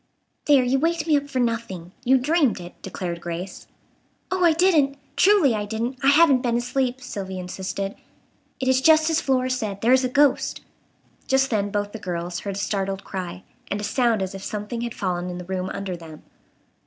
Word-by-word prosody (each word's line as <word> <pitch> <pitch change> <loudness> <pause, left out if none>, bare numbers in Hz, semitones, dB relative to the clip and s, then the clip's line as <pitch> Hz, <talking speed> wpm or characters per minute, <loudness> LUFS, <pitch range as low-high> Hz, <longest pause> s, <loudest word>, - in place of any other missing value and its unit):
"There, 280 -3 +5
you 255 +2 +1
waked 330 +1 0
me 315 -2 +3
up 285 0 -1
for 270 - -4
nothing. 230 -8 -2
You 265 +1 +5
dreamed 280 - +2
it," 175 0 -9
declared 175 -2 -5
Grace. 175 +2 -6 0.6
"Oh, 370 -1 +1
I 340 - +6
didn't! 310 -5 +3 0.2
Truly, 380 - +5
I 210 -1 -2
didn't. 230 +5 -3
I 270 - +1
haven't 285 -2 +6
been 235 -2 +1
asleep," 250 +1 -1
Sylvia 195 -6 -5
insisted. 190 +2 -4 0.7
"It 260 - -2
is 260 0 +3
just 315 +1 +5
as 320 - +2
Flora 255 -1 +1
said. 215 -6 -3
There 235 +3 +4
is 260 0 +4
a 255 - 0
ghost." 280 +1 +2 0.7
Just 265 0 +2
then 205 -2 0
both 205 0 -2
the 225 - -7
girls 175 -2 -4
heard 200 -1 -5
a - - -4
startled 195 -1 -2
cry, 180 -1 -6 0.3
and 200 - -2
a - - -5
sound 230 -2 +1
as 190 - -4
if 195 0 -8
something 210 +3 -4
had 235 -1 -4
fallen 180 -2 -2
in 175 - -5
the 180 - -7
room 185 0 -3
under 195 -2 -4
them. 160 -2 -12
230 Hz, 200 wpm, -23 LUFS, 190-270 Hz, 0.7 s, I